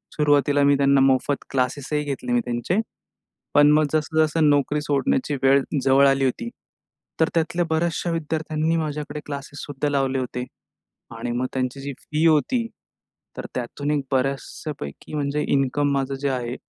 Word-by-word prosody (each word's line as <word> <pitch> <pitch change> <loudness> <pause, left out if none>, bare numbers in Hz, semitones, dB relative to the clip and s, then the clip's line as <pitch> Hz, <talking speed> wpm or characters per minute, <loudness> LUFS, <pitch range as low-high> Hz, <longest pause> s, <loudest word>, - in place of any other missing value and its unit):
सुरुवातीला 145 -1 +3
मी 140 0 +5
त्यांना 140 0 +4
मोफत 135 +1 +2
क्लासेसही 140 +3 -1
घेतले 135 -4 -4
मी 120 - +4
त्यांचे. 120 - -1 0.8
पण 145 0 +7
मग, 155 +1 +4
जसं, 155 0 -1
जसं 155 0 +2
नोकरी 145 +1 +2
सोडण्याची 140 0 0
वेळ 135 +1 +5 0.2
जवळ 135 +1 +5
आली 135 0 +2
होती, 235 - -1 0.7
तर 160 - +4
त्यातल्या 170 +1 +1
बऱ्याचशा 170 +1 0
विद्यार्थ्यांनी 160 0 -1
माझ्याकडे 150 -1 -3
क्लासेससुद्धा 145 0 -5
लावले 135 -2 0
होते. 125 -1 -3 0.7
आणि 120 +1 -3
मग 125 +2 -1
त्यांची 130 +1 -2
जी 140 0 -5
फी 155 +2 -1
होती, 165 - +3 0.7
तर - - -5
त्यातून 140 +4 -3
एक 145 - +1
बऱ्याचशापैकी 135 - -3
म्हणजे 145 0 -1
इन्कम 140 +1 +1
माझं 135 0 -1
जे 140 - +1
आहे, 125 -1 -2
145 Hz, 145 wpm, -23 LUFS, 135-150 Hz, 0.8 s, पण